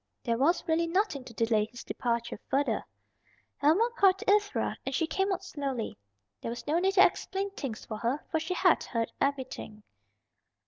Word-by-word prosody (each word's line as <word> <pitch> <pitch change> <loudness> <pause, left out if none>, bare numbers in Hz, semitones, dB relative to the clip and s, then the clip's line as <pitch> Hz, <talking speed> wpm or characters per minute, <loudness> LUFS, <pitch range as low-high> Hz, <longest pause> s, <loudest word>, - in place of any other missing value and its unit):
There 230 -1 0
was 335 +6 +2
really 330 +1 +2
nothing 355 -5 0
to 240 - -10
delay 225 -2 +2
his 240 +1 -10
departure 235 -3 -2
further. 280 +2 +1 0.7
Helma 325 +11 +4
called 385 -1 +5
to 390 - +1
Ivra, 415 0 -1
and 270 - -3
she 325 - +2
came 385 +5 0
out 380 0 -2
slowly. 275 - -3 0.5
There - - -4
was 235 - -6
no 315 +3 +2
need 385 +2 +1
to 375 - +9
explain 390 +1 -1
things 270 - -6
to 215 - -5
her, 240 +7 -1
for 320 - +2
she 325 +3 -3
had - - +4
heard 230 -2 -2
everything. 260 -6 -2
290 Hz, 180 wpm, -30 LUFS, 240-370 Hz, 0.7 s, to